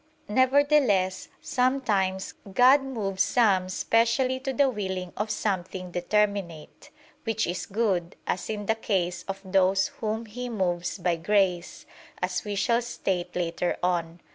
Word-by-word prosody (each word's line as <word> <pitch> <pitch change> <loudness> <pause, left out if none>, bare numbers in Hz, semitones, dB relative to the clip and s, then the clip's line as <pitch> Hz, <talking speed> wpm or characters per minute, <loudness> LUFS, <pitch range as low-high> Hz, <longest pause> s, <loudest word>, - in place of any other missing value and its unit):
Nevertheless, 260 -6 +3
sometimes 215 -8 0 0.2
God 255 +7 +6
moves 210 -8 -3
some 195 -7 +3
specially 235 +6 +1
to 270 +1 -3
the 275 +1 +3
willing 190 -6 -3
of 210 +1 -2
something 185 -3 -3
determinate, 180 -3 -1 0.3
which 225 -1 0
is 175 -2 -4
good; 195 -5 -1
as 180 - -2
in 210 -1 -3
the 225 - +2
case 180 -5 -1
of 195 0 -4
those 190 0 +2
whom 220 +1 -2
He 245 +3 -6
moves 180 -6 -1
by 175 -2 0
grace, 180 -1 0 0.3
as - - -2
we 205 -2 -4
shall 235 +4 +2
state 180 -6 -3
later 175 0 -1
on 170 -2 0
(Q. - - -33
195 Hz, 140 wpm, -26 LUFS, 180-230 Hz, 0.3 s, God